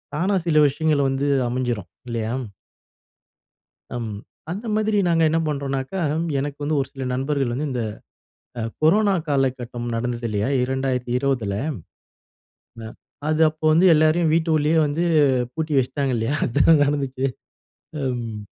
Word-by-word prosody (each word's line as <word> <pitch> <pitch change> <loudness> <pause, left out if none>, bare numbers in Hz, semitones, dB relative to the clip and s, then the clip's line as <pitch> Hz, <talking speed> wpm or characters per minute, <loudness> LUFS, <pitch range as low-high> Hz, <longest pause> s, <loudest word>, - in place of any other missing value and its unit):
தானா 190 +5 +1
சில 155 -2 +4
விஷயங்கள் 145 -1 +1
வந்து 135 +2 -1 0.2
அமைஞ்சிரும். 120 -8 -2 0.2
இல்லையா? 115 0 -2 1.6
ம். 110 -3 -4 0.4
அந்த 210 +5 -6
மாதிரி 215 -1 +1
நாங்க 165 -1 +3
என்ன 165 +1 +1
பண்றோன்னாக்கா, 140 +4 -3 0.4
எனக்கு 145 +1 -3
வந்து 150 +1 0
ஒரு 135 - -2
சில 135 -1 -6
நண்பர்கள் 135 -2 -1
வந்து 145 +3 -2
இந்த 125 -2 -2 0.8
அ - - -2 0.2
கொரோனா 200 +5 +4
காலகட்டம் 125 -3 -1
நடந்தது 120 0 -2
இல்லையா? 105 +2 -1
2020ல. 125 -3 -1 1.3
அ. - - -5 0.4
அது 155 +1 +1
அப்போ 155 0 -7
வந்து 175 +4 +4
எல்லோரையும் 155 +1 +3
வீட்டுக்குள்ளேயே 160 -1 +2
வந்து 150 +4 -1 0.5
பூட்டி 160 0 -3
வச்சுட்டாங்க 135 +1 -1
இல்லையா? 115 +6 -1
அதானே 145 +6 +4
நடந்துச்சு 135 -2 -1 0.9
ம். 115 -3 -4
140 Hz, 125 wpm, -22 LUFS, 125-155 Hz, 1.6 s, சில